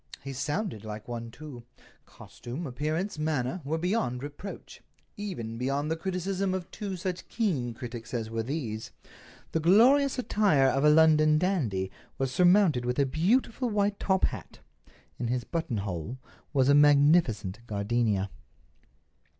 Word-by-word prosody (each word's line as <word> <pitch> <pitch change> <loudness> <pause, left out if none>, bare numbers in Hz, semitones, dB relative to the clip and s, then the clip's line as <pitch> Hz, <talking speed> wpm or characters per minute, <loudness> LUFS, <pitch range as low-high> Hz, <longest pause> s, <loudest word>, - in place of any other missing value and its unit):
He 135 0 -6
sounded 145 - -3
like 105 -1 -7
one, 115 -1 -5
too. 140 -1 -10 0.5
Costume, 130 +8 -8
appearance, 155 +7 -3
manner, 155 +1 -1
were 155 +4 -1
beyond 160 - -1
reproach—even 145 - -8
beyond 140 +4 -1
the - - +1
criticism 185 +2 -2
of 185 -2 -6
two 200 -3 -5
such 180 0 -4
keen 140 - -1
critics 120 -1 -8
as 115 -3 -2
were 115 0 -2
these. 115 -4 -4 0.6
The 160 - 0
glorious 250 - +5
attire 205 - +3
of 135 +1 +1
a 150 - +6
London 155 0 +5
dandy 125 - 0 0.3
was 135 -1 -1
surmounted 175 -4 +4
with 125 0 -2
a 140 - +3
beautiful 225 - +1
white 205 -1 0
top 190 -1 +2
hat. - - -6 0.6
In 120 - -2
his 125 +1 -1
buttonhole 105 - -3 0.3
was 135 -3 +2
a 140 - +6
magnificent 145 - +4
gardenia. 105 -2 0
145 Hz, 135 wpm, -28 LUFS, 120-180 Hz, 0.6 s, a